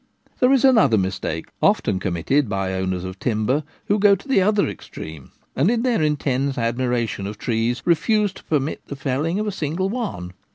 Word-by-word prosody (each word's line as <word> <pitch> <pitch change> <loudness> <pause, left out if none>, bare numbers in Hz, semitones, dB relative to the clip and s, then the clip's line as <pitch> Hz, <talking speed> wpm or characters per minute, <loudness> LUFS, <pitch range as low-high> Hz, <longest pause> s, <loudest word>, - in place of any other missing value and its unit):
There 250 - +4
is 270 -1 +4
another 220 - +5
mistake, 95 -4 -2
often 95 - +2
committed 95 - 0
by 95 -2 -1
owners 95 -1 -2
of 95 +1 -7
timber, 125 +6 0 0.2
who 205 +1 +1
go 200 0 +6
to 195 - -13
the 265 -8 +3
other 205 +1 +2
extreme, 80 -4 -9 0.2
and 140 +9 +3
in 235 0 +1
their 245 -8 +1
intense 140 -3 0
admiration 115 -3 -1
of 105 +1 -6
trees 115 +2 -1
refuse 205 +4 +2
to - - -14
permit 150 -1 -1
the 140 - -6
felling 140 +5 -1
of 215 - -1
a 210 - -1
single 175 +2 -2
one. 195 - -4
135 Hz, 180 wpm, -22 LUFS, -, 0.2 s, go